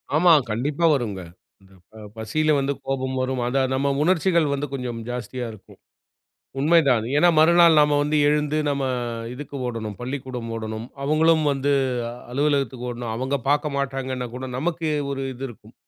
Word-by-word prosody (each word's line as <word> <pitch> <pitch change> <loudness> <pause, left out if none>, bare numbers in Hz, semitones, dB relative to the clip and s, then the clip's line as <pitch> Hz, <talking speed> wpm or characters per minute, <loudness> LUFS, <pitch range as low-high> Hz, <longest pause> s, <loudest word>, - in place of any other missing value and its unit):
ஆமா. 170 +2 +5 0.2
கண்டிப்பா 140 +9 0
வருங்க. 110 -8 -2 0.4
இந்த 95 0 -21 0.2
ப - - -21 0.2
பசில 155 +8 +1
வந்து 140 +1 0
கோபம் 130 -1 -2
வரும். 130 -1 -1
அதான் 130 +1 +1
நம்ம 140 +1 +1
உணர்ச்சிகள் 170 -1 +2
வந்து 140 +1 -2
கொஞ்சம் 125 -3 -4
ஜாஸ்தியா 125 +1 -4
இருக்கும். 110 -3 -16 0.8
உண்மைதான். 140 -7 +4
ஏன்னா, 175 +4 +5
மறுநாள் 170 0 +6
நம்ம 150 0 +3
வந்து 150 +1 0
எழுந்து, 150 +1 +1
நம்ம 140 -1 0 0.5
இதுக்கு 145 +1 -8
ஓடணும். 110 -4 -5
பள்ளிக்கூடம் 125 -2 -5
ஓடணும். 110 +1 -5 0.2
அவங்களும் 155 +2 +3
வந்து 140 +1 0 0.6
அலுவலகத்துக்கு 135 -3 0
ஓடணும். 120 -2 -5
அவுங்க 130 +4 -1
பார்க்க 145 0 +1
மாட்டாங்கன்னா 130 -2 -3
கூட 130 +1 -5
நமக்கு 165 +2 -1 0.2
ஒரு 135 - -4
இது 130 +1 -11
இருக்கும். 110 -1 -15
135 Hz, 145 wpm, -23 LUFS, 125-150 Hz, 0.8 s, மறுநாள்